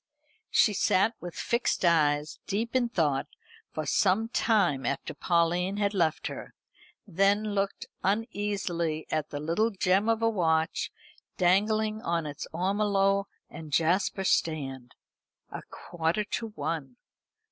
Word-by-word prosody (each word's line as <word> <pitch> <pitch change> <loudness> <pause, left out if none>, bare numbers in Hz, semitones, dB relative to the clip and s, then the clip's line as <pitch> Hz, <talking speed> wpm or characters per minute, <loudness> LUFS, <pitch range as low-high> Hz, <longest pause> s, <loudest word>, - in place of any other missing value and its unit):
She 215 - +4
sat 200 +3 +2
with 175 -1 -7
fixed 235 -5 0
eyes, 150 -3 +2
deep 225 +5 -2
in 245 -2 +2
thought, 150 -10 0 0.4
for 155 - -4
some 200 +9 +2
time 205 - +2
after 140 +3 -3
Pauline 175 +4 +1
had 205 0 +1
left 165 -5 0
her, - - -6 0.5
then 200 +2 +1
looked 195 0 -1 0.2
uneasily 195 -6 -1
at 155 -1 -1
the 145 - -5
little 170 +9 +1
gem 195 +1 +1
of 225 0 +1
a - - +4
watch 160 -4 0 0.5
dangling 215 +4 +2
on 170 -4 -1
its 145 -1 -6
ormolu 195 +2 +1 0.2
and 160 -2 -10
jasper 180 +6 +1
stand. 135 -9 -1 0.6
A - - -6
quarter 175 +4 -2
to 225 +2 -4
one. 160 - -4
185 Hz, 125 wpm, -28 LUFS, 160-210 Hz, 0.6 s, She